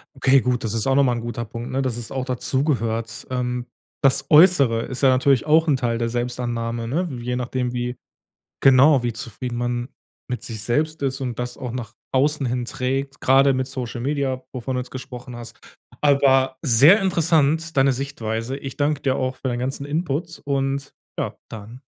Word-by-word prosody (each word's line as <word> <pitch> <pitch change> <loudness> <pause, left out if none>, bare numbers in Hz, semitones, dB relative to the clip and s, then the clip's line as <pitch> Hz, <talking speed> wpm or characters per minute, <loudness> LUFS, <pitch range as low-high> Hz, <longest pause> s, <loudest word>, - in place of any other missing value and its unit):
Okay 135 0 +4
gut, 125 -1 -1
das 110 -1 -2
ist 110 - 0
auch 135 - +3
noch 140 - +5
mal 125 -2 +2
'n 120 - -3
guter 120 0 -4
Punkt, 115 +2 -7
ne? 135 +1 0
Dass 125 -3 -2
es 115 -2 -7
auch 130 -1 -2
dazugehört. 115 -4 -1
Ähm, 125 -1 -2 0.4
das 135 -1 +2
Äußere 150 -8 +5
ist 130 - -6
ja 135 - +6
natürlich 130 0 +3
auch 160 +2 +4
'n 145 - +4
Teil 120 -3 -1
der 115 0 -1
Selbstannahme, 120 -1 -3
ne? 170 +8 -1
Je 125 +1 -3
nachdem, 125 0 -2
wie 125 0 -3 0.6
genau, 135 +1 +6
wie 120 -1 -1
zufrieden 120 +2 -6
man 120 +1 -2 0.4
mit 125 - -4
sich 110 -3 -6
selbst 155 +7 -1
ist 135 0 -2
und 125 -3 -4
das 125 0 -4
auch 125 -3 -5
nach 120 -2 -6 0.2
außen 140 +1 +1
hin 125 0 -1
trägt, 135 +2 -3
grade 135 +1 +4
mit 130 0 -1
Social 125 -3 -5
Media, 135 -1 -1
wovon 130 0 -4
du 125 - 0
jetzt 125 - -11
gesprochen 125 -1 -8
hast. 115 -1 -10 0.4
Aber 135 -2 +3
sehr 145 - +6
interessant 165 -3 +2
deine 135 0 +5
Sichtweise. 125 -2 -4
Ich 135 -2 -8
dank 145 0 0
dir 130 -1 +1
auch 130 0 -2
für 130 - -4
deinen 120 -1 -2
ganzen 135 +2 -3
Input 165 +1 -3
und, 135 0 -1 0.3
ja, - - -3
dann 110 +4 -10
130 Hz, 190 wpm, -22 LUFS, 120-140 Hz, 0.6 s, ja